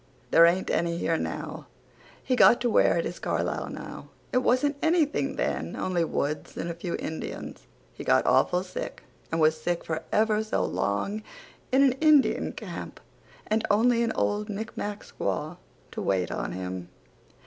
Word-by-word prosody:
There 170 0 +8
aint 180 +2 +1
any 170 0 0
here 165 -1 0
now. - - -5 0.6
He 255 - +1
got 240 - +7
to 240 -1 +1
where 170 - +4
it 165 - 0
is 175 - -5
Carlisle - - -2
now. - - -8 0.3
It 250 - +4
wasn't 255 +3 +2
anything 320 -2 +1
then - - -2
only 180 -2 0
woods 150 -2 -3
and 170 - -3
a - - -4
few 170 +1 -4
indians. 160 - -6 0.3
He - - -8
got - - +3
awful 180 +1 +3
sick 185 - -6 0.3
and 165 - 0
was 155 0 +3
sick 175 +1 -1
for 160 -1 -2
ever 215 0 +2
so 220 - 0
long 200 - -1 0.5
in 265 +2 +5
a - - -12
indian 305 -3 +4
camp - - -7 0.5
and 220 +1 0
only 230 +3 +4
an 230 -1 +1
old 210 +1 0
micmac 210 0 -4
squaw 155 +4 -3 0.3
to - - -5
wait 95 -2 0
on - - -3
him. 90 -1 -5
190 Hz, 165 wpm, -27 LUFS, 165-235 Hz, 0.6 s, There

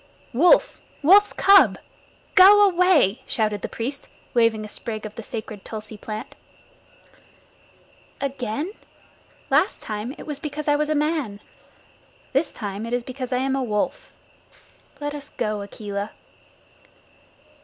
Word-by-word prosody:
"Wolf! 350 - +4 0.2
Wolf's 400 +7 +6
cub! 395 0 +6 0.6
Go 410 +2 +8
away!" 355 - +3
shouted 215 -2 0
the - - -4
priest, 265 +5 -5 0.2
waving 230 -2 +2
a - - -7
sprig 215 +1 -5
of 210 - -7
the 230 - -7
sacred 215 -2 -7
tulsi 215 0 -8
plant. 215 +1 -7 1.9
"Again? 275 - -3 0.8
Last - - +2
time 215 +5 -5
it - - -10
was 295 -2 -5
because 300 0 -5
I 290 - +4
was 300 +1 0
a 310 - +1
man. 295 -9 -1 0.9
This 275 +5 +1
time 205 0 -5
it 235 - -5
is 245 -1 0
because 255 0 -6
I 250 - +1
am 270 0 0
a 270 - -1
wolf. 210 -5 -2 0.9
Let 290 0 -4
us 290 -1 -8
go, 215 -4 -3
Akela." 200 0 -5
250 Hz, 135 wpm, -23 LUFS, 215-300 Hz, 1.9 s, Go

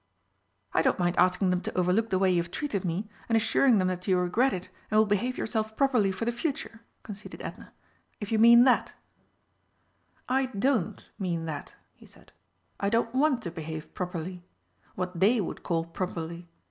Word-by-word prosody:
"I - - +3
don't - - +2
mind 175 0 +1
asking 185 +1 +3
them 180 0 0
to - - -5
overlook 185 +5 +2
the 190 - +1
way 190 0 +3
you 175 -1 +3
have 170 - -7
treated 210 -3 -3
me, 185 +4 -2 0.2
and 225 - +4
assuring 230 +2 +3
them 185 -2 +2
that 180 -1 -5
you 185 -2 +3
regret 195 +9 +2
it 185 -3 -5 0.2
and 215 - +2
will 215 - +6
behave 210 +5 0
yourself 220 -1 -2
properly 250 -8 +3
for 190 +5 -4
the 240 - +1
future," 235 -3 -4 0.2
conceded 210 0 -9
Edna, - - -8 0.5
"if 205 0 -6
you 220 - +2
mean 235 +1 +8
that." 255 -1 +3 1.3
"I 260 +1 +1
don't 245 -3 -1
mean 170 -4 -2
that," 150 -3 -6 0.2
he - - -18
said; - - -20 0.5
"I 200 - +1
don't 230 +1 +1
want 265 -2 +2
to 170 - -4
behave 160 -1 -7
properly 180 0 -5 0.5
what 180 -1 -4
they 220 +6 +4
would 195 - -4
call 165 -1 -1
properly. 170 0 -5
195 Hz, 185 wpm, -28 LUFS, 180-230 Hz, 1.3 s, mean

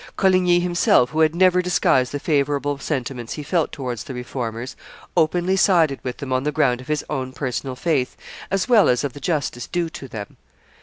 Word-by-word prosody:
Coligny 185 -2 +4
himself, 175 -8 +3
who 155 - -2
had 160 0 +3
never 180 0 +4
disguised 135 -8 +2
the 145 - -3
favorable 145 -1 0
sentiments 130 -4 -4
he 150 - -6
felt 165 +1 0
towards 125 -6 -5
the 130 - -8
Reformers, 125 -1 -5 0.4
openly 175 +4 +2
sided 165 -8 +3
with 125 -1 -5
them 135 -2 -4
on 130 - +1
the 150 +2 -1
ground 125 -3 +1
of 130 - -13
his 150 -1 -1
own 130 -3 -4
personal 130 0 -3
faith, 140 -3 -1 0.3
as 195 -1 0
well 235 -5 +5
as 125 +2 +2
of 140 -3 -3
the - - -9
justice 140 -6 -2
due 170 -2 -2
to 140 - -8
them. 110 -4 -8
145 Hz, 195 wpm, -22 LUFS, 130-175 Hz, 0.4 s, well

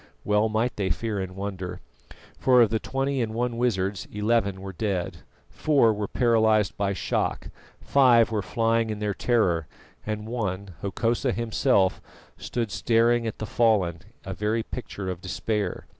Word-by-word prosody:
Well 105 +1 +2
might 115 +3 -1
they 100 -2 0
fear 110 -1 -2
and 95 -1 -5
wonder, 95 -2 -5 0.6
for 125 -2 +6
of 110 - +1
the 110 - +1
twenty 135 +1 -1
and 110 -1 -2
one 120 0 -1
wizards 100 -5 -1
eleven 105 -2 0
were 95 0 -7
dead, 95 -2 -2 0.3
four 140 -7 +3
were 105 -1 -3
paralysed 110 -4 +2
by 100 -1 0
shock, 95 - -2 0.3
five 120 -4 +4
were 110 -2 0
flying 115 +2 +1
in 105 - -3
their 105 -1 -1
terror, 90 -9 +1 0.4
and 105 0 -4
one, 100 -5 -3
Hokosa 115 +6 0
himself, 115 -4 +1 0.3
stood 115 -4 -3
staring 115 +2 +2
at 110 - -4
the 110 - -4
fallen, 105 -8 +2 0.3
a 95 - -4
very 110 +3 -1
picture 105 -5 -6
of 90 -2 -4
despair. 100 +1 -2
110 Hz, 155 wpm, -26 LUFS, 95-115 Hz, 0.6 s, for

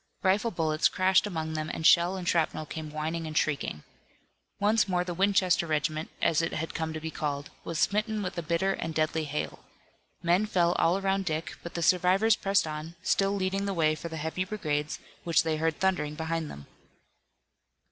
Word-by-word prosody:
Rifle 205 +4 +3
bullets 160 -5 +1
crashed 185 +2 +3
among 160 -4 -3
them 155 0 -3
and 160 - -4
shell 175 +4 +5
and 180 -2 -5
shrapnel 160 -2 +1
came 155 0 -6
whining 160 +2 -3
and 155 -1 -4
shrieking. 140 - -1 0.8
Once 210 +2 +3
more 180 -2 +1
the 180 -1 -4
Winchester 185 -2 +2
regiment, 155 0 -1
as 160 0 +3
it 165 - -2
had 160 +1 -3
come 160 0 -2
to 155 - -4
be 160 +1 -5
called, 145 -3 -3
was 165 - -4
smitten 215 +4 +1
with 180 - -4
a 170 - -2
bitter 170 +4 0
and 165 -4 -4
deadly 155 0 0
hail. 150 +1 -4 0.6
Men 175 +5 +3
fell 175 -4 +2
all 175 +3 +3
around 195 0 0
Dick 160 -1 -3
but 170 - -9
the 170 - -1
survivors 185 +6 +4
pressed 195 -3 +2
on, 155 +2 -6
still 195 0 +2
leading 195 +1 -1
the 195 - -2
way 155 -2 +3
for 170 +2 -6
the 160 - -6
heavy 160 +4 -2
brigades 155 -7 -2 0.3
which 165 -3 +3
they 160 -1 0
heard 160 0 -1
thundering 150 -6 0
behind 160 0 -2
them. 70 0 -10
165 Hz, 190 wpm, -28 LUFS, 155-190 Hz, 0.8 s, shell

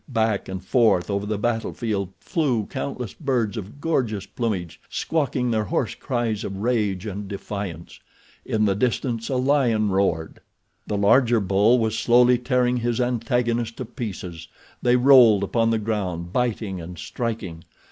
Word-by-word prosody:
Back 110 -6 0
and 95 -1 -6
forth 105 -4 +3
over 100 +1 -2
the 105 0 -1
battle 115 +2 -1
field 105 -5 -2
flew 130 - 0
countless 125 -4 -5
birds 125 -8 -1
of 110 +6 -7
gorgeous 120 - -1
plumage, 100 -6 -3
squawking 135 -6 -1
their 110 -2 0
hoarse - - -1
cries 120 -4 -2
of 95 -1 -5
rage 105 -3 0
and 100 -1 -5
defiance. 100 -4 -6 0.4
In 110 -1 0
the 100 - +3
distance 115 +1 -1
a 135 - 0
lion 125 -5 +2
roared. 90 -5 0 0.5
The 105 - -1
larger 115 +3 +4
bull 100 +5 +3
was 110 -2 0
slowly 125 +1 +5
tearing 125 -1 +1
his 120 0 -1
antagonist 120 -1 0
to 130 - -4
pieces. 90 -8 -7 0.3
They 120 0 +3
rolled 125 -6 +6
upon 115 +3 +1
the 115 - +2
ground 95 -5 -3
biting 110 -7 -1
and 85 +2 -9
striking. 105 -7 -4
110 Hz, 150 wpm, -23 LUFS, 100-125 Hz, 0.5 s, rolled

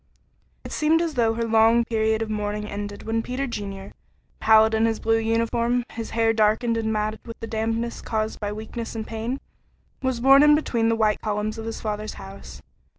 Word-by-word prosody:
It - - -8
seemed 310 +2 +2
as 335 -2 -1
though 230 -4 +2
her 230 - -1
long 225 +1 +4
period 220 -1 +1
of 220 - -6
mourning 210 0 -2
ended 205 0 -6
when 225 +1 -1
Peter 255 +4 -3
Junior, 200 -5 -6 0.5
pallid 220 0 +5
in 220 +1 +3
his 225 -1 -1
blue 225 0 +2
uniform, 230 +2 +1
his 230 -1 -6
hair 225 0 +3
darkened 220 +2 +2
and 220 -1 -1
matted 215 0 -1
with 230 -1 -9
the 225 - -5
dampness 225 +1 -2
caused 220 -1 -2
by 205 -1 -3
weakness 220 +2 -6
and 220 -1 -4
pain, 230 +5 -4 0.6
was 260 -2 -1
borne 270 +3 +7
in 295 0 +7
between 235 -7 +1
the 230 - +2
white 215 -2 +1
columns 215 +1 -2
of 220 - -6
his 225 - -5
father's 215 0 -4
house. 65 -10 -11
225 Hz, 195 wpm, -24 LUFS, 215-230 Hz, 0.6 s, borne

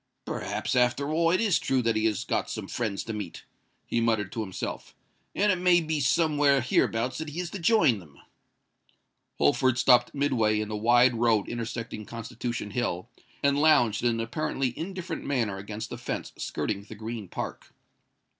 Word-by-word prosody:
"Perhaps, 105 +6 -3
after 125 +4 +2
all, 165 +1 +3
it 180 - +3
is 210 -6 +3
true 130 -2 0
that 115 -1 +1
he 110 0 +1
has 110 -3 0
got - - -1
some - - -5
friends 110 -5 -2
to 115 - -5
meet," 105 -5 -6 0.4
he 115 - 0
muttered 110 -4 +1
to 115 - -3
himself; 95 -4 -5 0.4
"and 205 +1 +3
it 185 - 0
may 180 -1 +5
be 160 -2 -1
somewhere 145 0 +3
hereabouts 125 0 +1
that 160 -1 -4
he 155 +4 -6
is 175 -1 -3
to 200 - -5
join 165 - +4
them." 75 -6 -16 1.2
Holford 120 - +3
stopped 125 +2 +4
midway 115 -7 +2
in 105 0 -3
the 105 - -3
wide 120 +3 +4
road 115 -3 +2
intersecting 115 -2 -5
Constitution 115 -1 -5
Hill, 100 -6 -2 0.3
and 140 0 +3
lounged 120 -9 +4
in 120 - +4
an 115 -1 -1
apparently 125 +1 -2
indifferent 185 -1 -5
manner 115 -8 -1
against 105 +2 -6
the - - -6
fence - - -4
skirting 100 - -3
the 110 +2 -11
Green 110 -1 -6
Park. - - -6
120 Hz, 175 wpm, -27 LUFS, 110-145 Hz, 1.2 s, may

